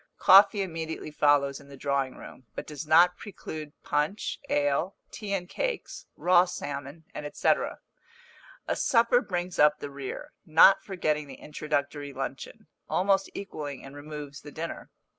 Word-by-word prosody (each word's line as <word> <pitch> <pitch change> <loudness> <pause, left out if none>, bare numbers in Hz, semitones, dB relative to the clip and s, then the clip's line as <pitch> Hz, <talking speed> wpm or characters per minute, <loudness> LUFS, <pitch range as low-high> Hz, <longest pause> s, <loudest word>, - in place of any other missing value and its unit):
Coffee 200 +1 +7
immediately 160 -3 -5
follows 145 -2 +3
in 140 - -16
the 140 - -11
drawing 135 -1 -1
room, 130 - -12
but - - -5
does 150 0 -7
not 175 +3 +5
preclude 155 -7 -8
punch, 150 +8 -1
ale, 145 +6 +1 0.2
tea 210 -2 -6
and 180 -2 -4
cakes, - - -4
raw 180 0 +5
salmon, 145 -2 -6 0.3
&c. - - 0 1.2
A - - 0
supper 235 0 +3
brings 180 -3 -4
up 150 0 +6
the 145 - -7
rear, 140 -1 -7
not 165 +5 +6
forgetting 155 -6 -1
the 135 - -9
introductory 145 -1 -3
luncheon, 135 +11 -6 0.2
almost 195 +1 +2
equalling 150 -8 -6
in 135 - -11
removes 145 -1 -8
the 145 - -11
dinner. 165 +3 -6
150 Hz, 140 wpm, -28 LUFS, 140-180 Hz, 1.2 s, Coffee